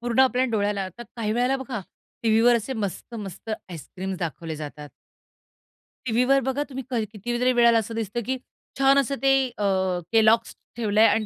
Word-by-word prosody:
पूर्ण 240 +1 +1
आपल्या 255 -1 +4
डोळ्याला. 205 -2 0
आता 190 +6 -9
काही 215 -2 -1
वेळेला 250 +3 +2
बघा, 255 -5 -5 0.4
टीव्हीवर 230 +2 +5
असे 230 +4 -3
मस्त-मस्त 210 -1 -5 0.2
आईस्क्रीम्स 185 +2 -6
दाखवले 165 -1 -4
जातात. 150 -1 -8 1.2
टीव्हीवर 250 +4 +3
बघा 265 +3 -1
तुम्ही, 265 -1 -5
कधी 230 -4 0
कितीतरी 240 +4 -1
वेळेला 235 -1 +5
असं 225 +1 -5
दिसतं 225 +1 -2
की 260 +1 -1 0.4
छान 270 0 +5
असं 275 0 0
ते 270 0 +4 0.2
अ, 210 - -2 0.5
केलॉग्स 225 0 +4 0.2
ठेवलंय 220 -1 +4
अन् 215 +1 +2
230 Hz, 155 wpm, -25 LUFS, 205-250 Hz, 1.2 s, टीव्हीवर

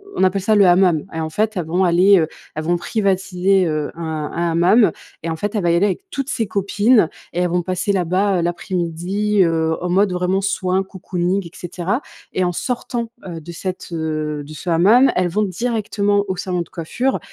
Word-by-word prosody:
on - - +1
appelle 190 +1 +2
ça 215 +2 +2
le 200 - +6
hammam. 175 -3 +4
Et 165 - -3
en 160 0 -2
fait, 215 +5 -1
elles 175 - -1
vont 175 +4 +1
aller, 185 +3 +5
heu, 160 - +1 0.3
elles 155 - -3
vont 175 +2 +1
privatiser, 190 -1 +1
heu, 155 -2 -2
un 170 - -7 0.3
un 170 0 -1
hammam. 180 +7 +4 0.3
Et 165 - -2
en 160 - -2
fait, 205 +6 -3
elle 205 - 0
va 170 - +3
y - - +3
aller 180 +4 +3
avec 200 - -3
toutes 275 -6 -4
ses 225 - -1
copines 205 0 +3 0.2
et 175 - -2
elles 180 -1 +1
vont 175 0 0
passer 185 +3 -1
là-bas, 190 +1 +1
heu, - - +1
l'après-midi, 180 +3 0
heu, 160 -1 +1
en 180 - -1
mode 190 +1 +2
vraiment 180 +1 0
soin 190 -1 0
cocooning 190 0 -2
et 170 - -10
cetera. 180 - -3 0.3
Et 185 - 0
en 175 - +1
sortant, 235 +2 -3 0.2
heu, 165 -3 -6
de 170 - -9
cette, 185 +2 -5
heu 155 -2 -3
de 155 - -10
ce 175 - -6
hammam, 185 +9 +5 0.2
elles 180 -1 +1
vont 210 +5 0
directement 205 -1 0
au 190 - -2
salon 180 -1 -2
de - - -7
coiffure, 240 +11 -2
185 Hz, 215 wpm, -20 LUFS, 170-200 Hz, 0.3 s, le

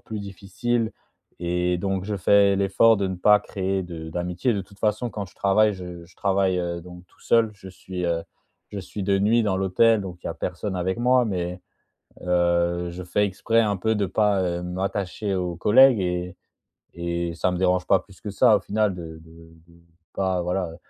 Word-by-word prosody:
plus 110 -1 -6
difficile. 100 +4 -2 0.5
Et 90 0 0
donc, 95 0 -2
je 105 0 -3
fais 100 +1 +4
l'effort 100 +4 +4
de 100 -1 -1
ne 95 - -4
pas 105 +3 +5
créer 95 0 -2
de 85 -3 -8
d'amitié. 90 +8 -1
De 100 - -1
toute 100 +1 -14
façon, 110 +3 0
quand 105 -1 -5
je 95 - -20
travaille, 105 +1 +3
je 90 -2 -9
je 85 - -21
travaille, 95 -2 +1
heu, 85 -1 -3
donc 90 +1 -12
tout - - -29
seul. 115 -2 +3
Je 95 -1 -12
suis, 90 0 -6
heu, 85 -1 0 0.5
je 100 - -6
suis 100 +2 -6
de 100 0 +1
nuit 115 +4 +3
dans 100 -3 0
l'hôtel, 105 +4 +3
donc 90 -3 -7
il - - -7
y - - -2
a - - -6
personne 95 +2 -4
avec 95 +3 -2
moi. 125 +1 +3
Mais, 90 -3 -3 0.6
heu, 85 0 +1
je 90 +1 -7
fais 105 +3 +1
exprès 115 +4 +1
un 105 -3 0
peu 110 +4 0
de 105 -2 0
pas, 100 +1 +1
heu, 85 0 -2
m'attacher 95 +2 -3
aux 90 -2 -2
collègues 115 +5 +6
et 90 0 -2 0.6
et 85 0 -3
ça 90 - 0
me 90 - -2
dérange 90 0 +1
pas 95 - +4
plus 95 0 -19
que 105 - -6
ça, 110 +1 +5
au - - -2
final, 105 -1 0
de 85 - -7 0.2
de 80 - -17 0.4
de 85 0 -20 0.3
pas 95 -2 -1
voilà, 90 0 -2
heu, - - -11
95 Hz, 205 wpm, -24 LUFS, 90-105 Hz, 0.6 s, collègues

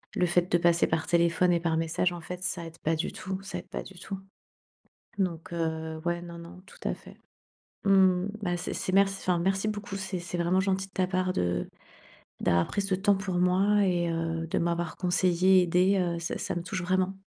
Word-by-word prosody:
le 180 - +3
fait 175 +1 +1
de 175 - +5
passer 170 -1 +4
par 160 0 -1
téléphone 170 +1 +3
et 170 - +3
par 165 -1 0
message, 165 +2 0
en 170 - -7
fait, 180 +3 -7
ça 175 -2 -2
aide 165 0 -10
pas 160 +1 +2
du 160 - -2
tout, 190 +1 -5
ça 195 - -6
aide - - -8
pas - - -4
du 190 - -13
tout. 195 -1 -6 1.0
Donc, 170 -2 -2
heu, 160 -1 -3
ouais, 175 0 0
non, 170 -1 -9
non, 175 +2 -11
tout - - -17
à - - 0
fait. - - -14 0.7
Mmh 195 - +4
mh. 185 -1 +4
Bah, 175 -2 -1
c'est - - -4
c'est 185 - -3
merc 200 0 +6
enfin, 185 -3 -1
merci 195 +3 0
beaucoup, 205 -1 -5
c'est 190 -1 -4
c'est 175 0 -5
vraiment 175 +2 +2
gentil 195 0 0
de - - -29
ta 185 -1 +1
part 185 0 0
de 90 0 0 0.7
d'avoir 85 0 +3
pris 200 - -1
ce 195 -1 -1
temps 200 +1 +3
pour 190 -2 -3
moi 195 +3 +3
et 175 -2 +1
heu, 165 0 -2
de - - -1
m'avoir 170 -1 -1
conseillée, 185 0 +4
aidée, 180 +3 +3
heu, 170 -1 0
ça 170 - -3
ça - - -3
me 170 - -3
touche 185 +1 -3
vraiment. 185 +1 +1
180 Hz, 220 wpm, -28 LUFS, 170-190 Hz, 1.0 s, merc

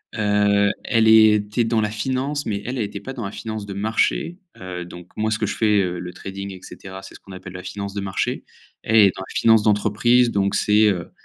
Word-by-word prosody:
Heu, 105 -1 +2
elle 115 -3 +2
était 110 +1 +4
dans 115 -1 +1
la 105 - 0
finance, 130 +6 -2
mais 100 -2 -2
elle, 125 +2 -4
elle 110 - 0
était 100 0 -7
pas 135 - -7
dans 120 -5 -6
la 100 - -5
finance 110 -2 -6
de 100 - -7
marché, 110 - -1 0.2
heu, 90 -1 -6
donc 90 0 -11
moi 110 0 0
ce 110 - 0
que - - 0
je - - -4
fais, 105 -3 +3
heu, 90 -1 -2
le 90 0 -7
trading 100 +2 -7
et 95 - -12
cetera, 95 0 -10
c'est - - -12
ce - - -13
qu'on 95 - -13
appelle 95 -1 -10
la 90 - -8
finance 100 -1 -6
de 100 - -4
marché. 95 -1 -3 0.4
Elle, 110 - 0
elle 110 - +8
est - - +1
dans 95 - -6
la - - -11
finance 110 -2 +4
d'entreprise, 110 +4 +3
donc 100 -1 0
c'est, 105 +1 +3
heu 90 -4 -2
105 Hz, 245 wpm, -21 LUFS, 95-110 Hz, 0.4 s, elle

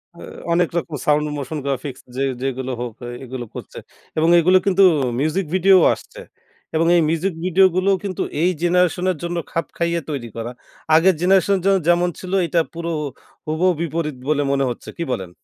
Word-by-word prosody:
আ - - -15 0.3
অনেক 175 0 +2
রকম 165 -2 -3
sound, 150 0 +3
motion-graphics 140 -2 -4
যে 135 - -2 0.2
যেগুলো 130 -1 -3
হোক, 120 -2 -4
আ - - -6 0.2
এগুলো 130 -1 -6
করছে - - -9 0.4
এবং 160 +1 +3
এগুলো 180 +3 +5
কিন্তু 195 0 +4 0.4
মিউজিক 155 +7 0
ভিডিও 190 +1 +6 0.2
আসছে। - - -11 0.6
এবং 165 +1 +2
এই 170 - +5
মিউজিক 170 +4 0
ভিডিও 185 +1 +5
গুলোও 190 +1 +3
কিন্তু 190 -3 -3 0.2
এই 175 - +4
জেনারেশনের 180 0 +2
জন্য 175 0 -3
খাপ 165 - -1
খাইয়ে 170 0 0
তৈরি 135 -6 -4
করা। 115 +1 -4 0.4
আগের 180 +3 +5
জেনারেশনের 190 +1 +3
জন্য 195 0 +4
যেমন 175 +1 +4
ছিলো, 185 +1 -3
এইটা 170 0 +2
পুরো 170 0 -4
ও - - -3 0.4
হুবহু 160 +4 +2
বিপরীত 160 -2 -2
বলে 145 -1 +2
মনে 140 0 +1
হচ্ছে। 120 - -7
কি 170 - -2
বলেন? 95 -7 -3
170 Hz, 175 wpm, -20 LUFS, 145-185 Hz, 0.6 s, ভিডিও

